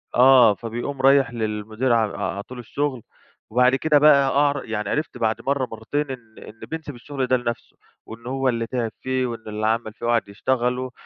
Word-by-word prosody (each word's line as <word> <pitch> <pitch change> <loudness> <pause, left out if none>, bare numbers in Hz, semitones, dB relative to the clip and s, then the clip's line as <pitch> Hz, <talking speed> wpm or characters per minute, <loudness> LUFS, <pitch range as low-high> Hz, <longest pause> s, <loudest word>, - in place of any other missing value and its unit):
آه 125 -4 +7
فبيقوم 120 +5 -5
رايح 135 -2 +4
للمدير 110 +2 -1
ع 110 -3 +1 0.2
عاطي 100 +6 -8
له 125 - -9
الشغل 130 +1 -3 0.5
وبعد 125 +3 +4
كده 150 +1 +3
بقى 140 -2 +6
أعرف 145 -1 +2
يعني 105 -2 -3
عِرِفت 150 0 -2
بعد 110 0 -1
مرّه 135 0 0
مرّتين 135 +6 -3
إن 115 -4 -10
إن 110 - -13
بينسِب 155 -4 -6
الشغل 135 +1 -4
ده 130 0 +3
لنفسُه، 120 -1 -5 0.3
وإنّه 115 +2 -9
هو 135 0 0
اللي 115 -2 -1
تعب 120 -3 -2
فيه 130 0 -1
وإنّه 115 -2 -5
اللي 110 0 -2
عمل 110 -1 -1
فيه 120 - -8
وقعد 120 -2 +1
يشتغلُه، 125 +3 -1
125 Hz, 185 wpm, -23 LUFS, 115-135 Hz, 0.5 s, آه